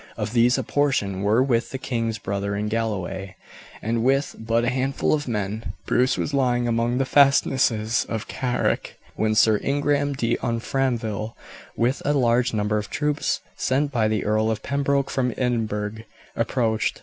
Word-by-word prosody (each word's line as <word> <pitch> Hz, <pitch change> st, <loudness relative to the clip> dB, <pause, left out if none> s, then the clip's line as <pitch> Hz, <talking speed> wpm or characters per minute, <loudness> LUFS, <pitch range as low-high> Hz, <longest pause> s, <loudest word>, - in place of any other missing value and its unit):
Of 110 Hz, -, -3 dB
these 120 Hz, +1 st, +4 dB
a -, -, -1 dB
portion 120 Hz, -10 st, 0 dB
were 105 Hz, +5 st, +3 dB
with 120 Hz, -3 st, +1 dB
the 135 Hz, -, -4 dB
king's 115 Hz, -4 st, -2 dB
brother 100 Hz, 0 st, -3 dB
in 105 Hz, +1 st, -2 dB
Galloway, 95 Hz, -4 st, -3 dB, 0.5 s
and 115 Hz, +1 st, 0 dB
with 135 Hz, +3 st, +1 dB
but 115 Hz, +1 st, 0 dB
a 120 Hz, -, +2 dB
handful 135 Hz, +2 st, 0 dB
of 150 Hz, -2 st, -1 dB
men 105 Hz, -2 st, -3 dB
Bruce 130 Hz, +1 st, +2 dB
was 145 Hz, -, -2 dB
lying 125 Hz, -3 st, +1 dB
among 120 Hz, +1 st, +1 dB
the 135 Hz, -, +1 dB
fastnesses 130 Hz, -5 st, +3 dB
of 115 Hz, -1 st, -3 dB
Carrick 125 Hz, -2 st, -1 dB, 0.2 s
when 110 Hz, 0 st, +1 dB
Sir 110 Hz, -1 st, +4 dB
Ingram 145 Hz, 0 st, +1 dB
de 120 Hz, -3 st, 0 dB
Umfraville, 115 Hz, -2 st, -2 dB, 0.4 s
with 125 Hz, +4 st, +1 dB
a 145 Hz, -, +1 dB
large 125 Hz, -2 st, +2 dB
number 105 Hz, 0 st, 0 dB
of 105 Hz, -, -6 dB
troops 150 Hz, 0 st, -1 dB
sent 140 Hz, +3 st, 0 dB
by 115 Hz, -4 st, +2 dB
the 110 Hz, -1 st, -1 dB
Earl 110 Hz, +1 st, +2 dB
of 110 Hz, -1 st, -2 dB
Pembroke 140 Hz, 0 st, 0 dB
from 125 Hz, -2 st, 0 dB
Edinburgh, 110 Hz, -4 st, -1 dB, 0.4 s
approached. 115 Hz, -2 st, 0 dB
115 Hz, 160 wpm, -24 LUFS, 110-135 Hz, 0.5 s, these